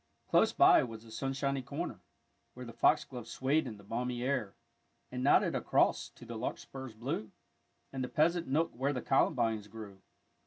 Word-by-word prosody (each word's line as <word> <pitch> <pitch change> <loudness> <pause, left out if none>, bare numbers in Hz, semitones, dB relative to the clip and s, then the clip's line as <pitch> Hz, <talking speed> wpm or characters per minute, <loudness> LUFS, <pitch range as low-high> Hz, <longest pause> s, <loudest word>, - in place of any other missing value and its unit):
Close - - +4
by - - +6
was 115 -2 -6
the 115 - -14
sunshiny 135 +3 -2
corner, 140 - -5 0.5
where 125 0 -8
The 115 - -9
foxgloves 125 -1 +1
swayed 135 +2 +1
in 110 -3 -7
the 100 - -15
balmy 120 +3 -3
air, 125 -7 -1 0.6
And 125 0 -3
nodded 140 - +4
across - - +2
to - - -15
the 115 -2 -6
larkspurs 130 0 -6
blue, 115 -1 -3 0.6
And 130 -1 -2
the 125 - -4
pleasant 170 +3 +2
nook 155 +5 +1
where 135 +4 -1
the 125 - -4
columbines 110 -5 +1
grew. 100 -2 -10
125 Hz, 165 wpm, -32 LUFS, 115-140 Hz, 0.6 s, by